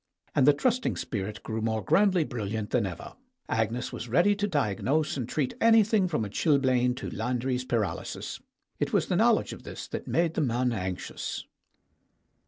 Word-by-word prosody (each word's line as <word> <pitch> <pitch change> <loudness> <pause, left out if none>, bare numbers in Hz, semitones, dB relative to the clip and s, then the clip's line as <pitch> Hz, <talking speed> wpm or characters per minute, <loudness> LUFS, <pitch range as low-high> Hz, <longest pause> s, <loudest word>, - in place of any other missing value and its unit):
And 135 -1 +3
the 145 - +8
trusting 250 - 0
spirit 105 -1 -4
grew 110 0 -3
more 110 -1 -1
grandly 185 0 +3
bril 115 -8 -4
liant 110 -1 -3
than 115 -5 +2
ever; 90 - -8 0.3
Agnes 110 +2 -1
was 120 - -6
ready 175 - +4
to 205 0 0
diagnose 145 - 0
and 125 -4 -4
treat 145 -4 -1
anything 220 -3 +5
from 150 -11 -1
a - - -4
chilblain 130 0 +2
to - - -6
Landry's 125 +1 -1
paralysis. 115 -6 -3 0.4
It - - -1
was - - +3
the - - -1
knowledge - - +3
of - - -10
this - - -8
that - - -5
made 165 -1 +1
the 165 - 0
man 125 -2 +1
anxious. 95 -4 -4
125 Hz, 175 wpm, -28 LUFS, 110-160 Hz, 0.4 s, the